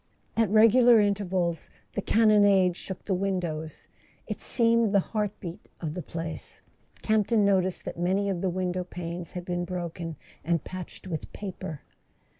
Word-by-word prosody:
At 225 -3 +2
regular 230 +3 +7
intervals 190 -5 0 0.2
the 205 - -1
cannonade 205 -5 +4
shook 190 0 -7
the 195 - 0
windows; 180 -5 -3 0.4
it - - -5
seemed 230 -3 +2
the - - +7
heart 210 +2 -1
beat 170 -2 -8
of 155 -3 -3
the 180 - -4
place. 165 -1 -6 0.4
Camp¬ 215 -2 +2
ton 220 -3 +3
noticed 190 -2 +1
that - - -6
many 190 +3 +1
of 190 -3 -1
the 190 - +1
window 180 0 -1
panes 175 -1 -6
had 180 -1 -5
been 175 -1 -2
broken, 170 -2 -4 0.3
and 165 -2 0
patched 185 0 -8
with 165 -4 -5
paper. 185 -6 -6
185 Hz, 155 wpm, -27 LUFS, 175-205 Hz, 0.4 s, regular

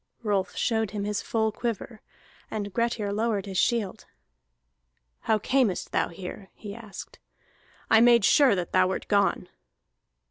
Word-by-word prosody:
Rolf 200 -4 -1
showed 220 -3 0
him 205 0 -4
his 205 0 -2
full 220 -1 0
quiver, 225 0 -5 0.5
and 205 -2 -4
Grettir 230 -3 -1
lowered 215 -2 -1
his 190 -2 -2
shield. 225 -6 0 1.1
"How 220 - +1
camest 230 -3 0
thou - - +1
here?" 185 +2 -9
he 205 -2 -8
asked. 220 -2 -10 0.7
"I 220 - +5
made 235 -3 +6
sure 275 -4 +5
that 180 -2 -3
thou 185 0 +4
wert 190 - -4
gone." 200 -3 +1
210 Hz, 140 wpm, -26 LUFS, 195-230 Hz, 1.1 s, made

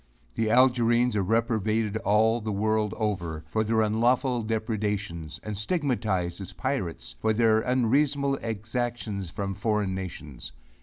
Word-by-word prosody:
The 110 -1 0
Algerines 120 -1 +4
are 105 - +2
reprobated 110 0 +1
all 110 +2 +2
the 110 0 -3
world 105 +1 0
over, 85 -8 -2
for 110 +7 0
their 110 +1 +2
unlawful 120 +3 +2
depredations; 105 -7 -3
and 105 -1 -4
stigmatized 105 - -1
as 95 -1 -8
pirates, 90 - -3
for 110 - +1
their 110 0 +4
unreasonable 135 +4 +2
exactions 110 -3 -3
from 100 +2 -3
foreign 105 -1 0
nations. 80 -10 -7
110 Hz, 125 wpm, -27 LUFS, 100-115 Hz, -, Algerines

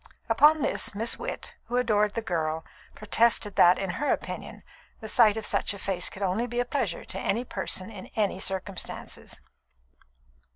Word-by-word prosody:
Upon 295 +6 +5
this, - - 0
Miss 225 +3 -1
Witt, - - -6
who 245 - -2
adored 210 -4 +2
the 230 - -2
girl, 160 -4 -2 0.3
protested 215 -2 +2
that, 175 +1 +7
in 195 -2 -2
her 295 - +2
opinion, - - -4 0.4
the 220 - -7
sight 220 -1 +5
of 220 - -3
such - - 0
a - - -8
face 190 -3 0
could 195 - -7
only 195 +6 0
be 240 0 -3
a 245 - +1
pleasure 245 - -2
to 190 - -5
any 230 +6 0
person 190 -1 -2
and 195 -4 -9
in - - -23
any 205 -3 0
circumstances. 190 0 -5
210 Hz, 175 wpm, -27 LUFS, 190-235 Hz, 0.4 s, that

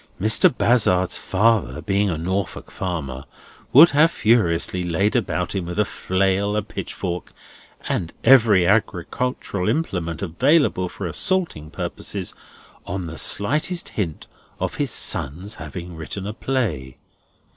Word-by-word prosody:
Mr. 110 - +4
Bazzard's 105 -8 +2
father, 105 - +1
being 100 +1 0
a 85 - -2
Norfolk 90 +2 -3
farmer, 70 -8 -4 0.5
would 160 +6 +8
have 150 +3 +5
furiously 95 - +2
laid 90 +5 0
about - - -1
him 90 -3 -3
with 90 - -5
a 105 - +3
flail, 95 +2 0
a 105 - 0
pitch - - -6
fork, 90 0 -4 0.6
and 85 - -2
every 115 -8 +6
agricultural 100 +1 -1
implement 90 - -2
available 95 - +2
for 100 - -7
assaulting 90 - -1
purposes, - - -5 0.5
on 95 +1 -3
the 80 -1 -6
slightest 150 - +2
hint 85 -8 -4 0.3
of - - -2
his - - -1
son's 90 +10 -2
having 90 -1 -7
written 80 +5 -6
a 105 - -4
play. 95 - -2
95 Hz, 130 wpm, -22 LUFS, 85-115 Hz, 0.6 s, would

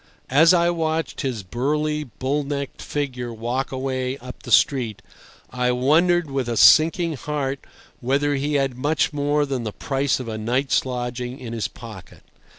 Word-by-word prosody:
As 160 +5 +6
I 175 -1 +4
watched 160 -1 -2
his 125 -8 -3
burly, 150 +8 -1
bull 135 +4 -2
necked 140 -1 -5
figure 130 -5 -3
walk 120 +4 -3
away 130 0 -2
up 125 -1 -10
the - - -9
street, 120 -7 +3 0.5
I 125 0 0
wondered 160 +6 +2
with 135 -3 -2
a 115 - -2
sinking 165 - +6
heart 140 -1 -3 0.4
whether 140 +4 +1
he 145 +2 -1
had 135 -3 +1
much 145 +4 0
more 145 0 +1
than 135 -4 -3
the 110 - -3
price 135 +2 -1
of 125 - -6
a 110 -1 -4
night's 125 +5 0
lodging 125 0 -4
in 115 -2 -7
his 115 -2 -2
pocket. 110 -7 -12
135 Hz, 160 wpm, -22 LUFS, 125-150 Hz, 0.5 s, As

